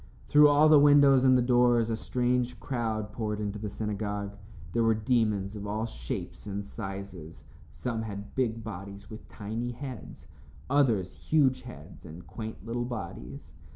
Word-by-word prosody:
Through 150 0 +7
all 145 +1 +5
the 155 -1 +8
windows 140 -2 +6
and 130 -1 +6
the 125 - +2
doors 120 -2 +3
a - - +1
strange 125 0 -1
crowd 110 -5 -3
poured 105 -2 -3
into 105 0 -3
the 105 0 -4
synagogue. 100 -1 -3 0.4
There 115 - +2
were 115 -1 +3
demons 110 -3 0
of 105 0 -6
all 110 +2 -2
shapes 65 - -6
and 100 0 -4
sizes. 95 -5 -8 0.3
Some 115 -3 -3
had 105 -2 -7
big 115 -3 -1
bodies 100 +2 -8
with 110 - -10
tiny 115 +4 -4
heads, 130 -2 -8 0.5
others 115 -10 +3
huge 140 -5 +2
heads 80 - -12
and 85 +1 -11
quaint 110 -2 -8
little 120 +1 -2
bodies. 85 - -7
110 Hz, 155 wpm, -29 LUFS, 100-125 Hz, 0.5 s, the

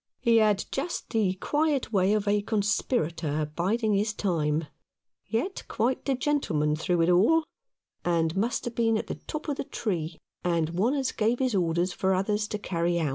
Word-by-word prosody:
He 235 -2 +4
had 210 -3 +3
just 310 +6 -3
the 205 -5 +1
quiet 290 +2 0
way 195 +1 +3
of 210 -1 0
a 205 0 +3
conspirator 170 - -1
biding 215 +5 +1
his 210 +2 +1
time 160 -6 0 0.6
yet 250 - -2
quite 250 +3 -1
the 275 - +1
gentleman 165 - +1
through 170 +1 +1
it 165 - +2
all 225 - +4 0.3
— - - -65 0.2
and 165 -1 +1
must 225 +5 0
have 240 - -3
been 225 -1 +2
at - - -3
the - - -4
top 305 +1 -5
of 290 -2 -1
the - - -2
tree, 170 - -3 0.3
and 165 -2 +1
one 210 +11 +1
as 270 -3 0
gave 230 +2 +1
his 255 -2 0
orders 175 -1 +1
for 190 0 +1
others 210 +3 0
to 210 - -3
carry 170 -3 -1
out. 155 -3 0
205 Hz, 185 wpm, -27 LUFS, 170-235 Hz, 0.6 s, He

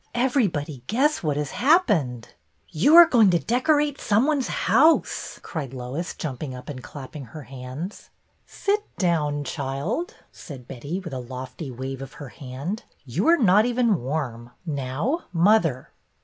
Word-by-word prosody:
Everybody 200 - 0
guess 290 +7 +2
what 150 -5 -1
has 150 -2 -2
happened." 205 - +2 0.4
You 240 - +4
are 345 0 +12
going 235 - +5
to 175 - +4
decorate 290 - +1
some 220 +3 +3
one's 290 -4 +1
house," 315 +3 +2
cried 140 -6 -5
Lois, 130 +8 -5
jumping 135 -3 -5
up 125 +2 -10
and 130 -3 -6
clapping 140 +1 -9
her 145 +6 -10
hands. 135 +8 -8 0.2
'' - - -43
Sit 410 +1 -1
down, 150 -5 +1
child," 145 - -3 0.2
said 130 -5 -11
Betty, 140 +8 -5
with 170 -6 -8
a 130 - -3
lofty 130 +3 -7
wave 130 +1 -6
of 135 - -8
her 145 -4 -9
hand. 140 - -6 0.2
You 140 - -1
are 340 +1 +6
not 210 - +5
even 235 - +2
warm. 125 -4 -3 0.2
Now, 150 - -2
mother." 170 - +2
155 Hz, 150 wpm, -24 LUFS, -, 0.4 s, are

